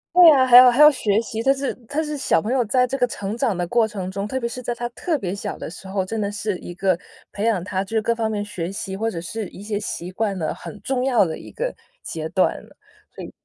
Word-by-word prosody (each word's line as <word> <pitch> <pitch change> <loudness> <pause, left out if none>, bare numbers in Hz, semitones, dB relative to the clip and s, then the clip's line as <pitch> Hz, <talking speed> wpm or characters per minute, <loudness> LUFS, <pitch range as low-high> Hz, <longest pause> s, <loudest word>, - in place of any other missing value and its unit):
对 355 -2 +10
啊， 265 -4 +6
还 245 -1 +8
有 250 0 +10
还 250 +5 +3
要 300 - +10
学 215 -6 +1
习， 225 -1 -5
他 270 +3 +4
是 275 0 -3
他 310 +2 -1
是 300 -1 -4
小 165 -11 +2
朋 220 - -3
友 255 -2 +2
在 250 +4 +3
这 270 +2 -3
个 245 - +2
成 205 -1 -5
长 235 -8 0
的 175 - -1
过 225 +5 +2
程 190 -3 -5
中， 200 +1 -3
特 260 - -3
别 235 - -1
是 250 +2 -6
在 240 0 -3
他 240 0 -3
特 310 +6 -2
别 190 -6 -4
小 200 - -5
的 - - -6
时 190 +3 -11
候， 190 0 -1
真 225 +3 -4
的 200 -1 -1
是 205 -2 -3
一 175 - -9
个 185 -1 0 0.3
培 205 +2 -3
养 210 -7 +1
他 190 0 -2
就 195 - -8
是 220 - +3
各 235 +2 +1
方 225 -1 -1
面 205 -1 -2
学 180 -4 -5
习 195 -1 -5
或 225 +2 0
者 170 -5 -5
是 210 +3 -5
一 195 - -12
些 205 -1 -2
习 180 -3 -5
惯 200 -1 -1
的 155 -3 -2
很 210 - -10
重 260 +2 -1
要 245 -6 +4
的 160 -2 -4
一 - - -11
个 - - -3 0.3
阶 160 -1 -5
段。 185 - +2 0.6
所 - - -7
以 - - -10
220 Hz, 305 characters per minute, -22 LUFS, 195-250 Hz, 0.6 s, 对